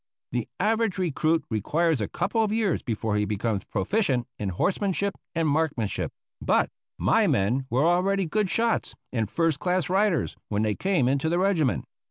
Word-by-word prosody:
The 120 -2 -2
average 220 +1 +1
recruit 165 -2 +1
requires 150 - +1
a 105 - -1
couple 225 - -1
of 215 -2 +1
years 215 -5 +1
before 110 -2 -1
he 105 - +1
becomes 105 0 -2
proficient 125 - 0
in 100 - -2
horsemanship 195 - 0 0.2
and 165 -1 +1
marksmanship; 145 -8 0 0.3
but - - +2 0.3
my - - +3
men 125 +7 +1
were 130 +5 +2
already 185 +3 +2
good 200 +4 0
shots 230 +2 0 0.2
and 110 -4 0
first 160 +5 +1
class 180 -1 0
riders 190 - +2
when 105 0 0
they 105 -1 +1
came 180 - +1
into 140 +4 +1
the 170 - +1
regiment. 180 -8 +1
160 Hz, 165 wpm, -26 LUFS, 115-195 Hz, 0.3 s, my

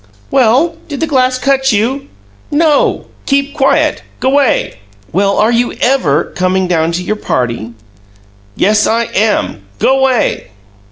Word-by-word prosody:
"Well, 265 +6 +2
did 285 -4 -6
the - - 0
glass 255 -4 +1
cut 270 0 +1
you?" 240 +7 -1 0.4
"No! 300 -1 +1 0.2
Keep 280 0 0
quiet! 270 -2 +1 0.2
G'way!" 270 - +1 0.4
"Well, 195 +3 +1
are 220 - +3
you 240 +1 0
EVER 175 - 0
comin' 185 +1 0
down 165 -2 0
to 180 +2 -2
your 215 - -2
party?" 120 - -3 0.8
"Yes, 210 +1 +2
I 230 +1 +1
am! 205 - 0
G'way!" 265 - +1
240 Hz, 125 wpm, -13 LUFS, 190-270 Hz, 0.8 s, are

